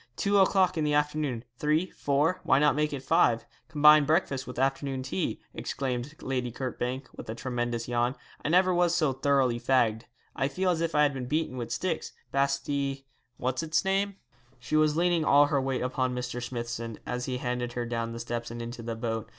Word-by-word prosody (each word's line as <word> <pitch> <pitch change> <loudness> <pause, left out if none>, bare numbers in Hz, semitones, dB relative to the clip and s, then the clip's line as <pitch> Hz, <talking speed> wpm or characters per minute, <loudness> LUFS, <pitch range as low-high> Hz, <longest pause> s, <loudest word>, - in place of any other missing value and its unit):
Two 200 +6 +2
o'clock 185 -2 +3
in - - +1
the 150 -1 +1
afternoon, 150 -5 0 0.2
three, 155 +4 +1
four; 150 +6 +1
why - - +4
not 150 +1 +4
make 150 0 +1
it 140 -2 -5
five 115 -3 +3 0.2
combine 150 0 +7
breakfast 140 -4 0
with 125 - -8
afternoon 135 0 0
tea,' 95 -7 -2
exclaimed 130 +2 -3
Lady 125 -2 -2
Kirkbank, 130 +1 -3
with - - -9
a 110 - -3
tremendous 120 -1 -3
yawn. 120 +1 0 0.3
'I - - -1
never 185 +2 +4
was 175 -1 +3
so 155 -6 +2
thoroughly 130 -3 +2
fagged; 115 -3 +2 0.3
I 135 - +1
feel 180 +6 0
as 165 -2 -1
if 165 -1 -1
I 150 - +5
had 145 -1 +2
been 130 -2 -5
beaten 155 -1 -1
with 120 -2 -4
sticks, 175 -4 -2 0.2
basti 140 0 -1 0.3
what's 130 +2 -1
its 165 +3 0
name.' 195 +1 +1 0.4
She 125 +5 -3
was 155 0 +3
leaning 175 -1 +2
all 145 -1 +6
her 145 -1 +1
weight 130 -1 -1
upon 130 0 -1
Mr. 125 0 -4
Smithson, 120 -2 -4
as 125 0 -3
he 130 -1 -2
handed 125 -1 -3
her 120 -1 -2
down 115 -1 -3
the 115 - -6
steps 120 0 -4
and 120 +1 -7
into 120 +1 -6
the 115 0 -4
boat. 115 -1 -3
135 Hz, 200 wpm, -28 LUFS, 120-150 Hz, 0.4 s, combine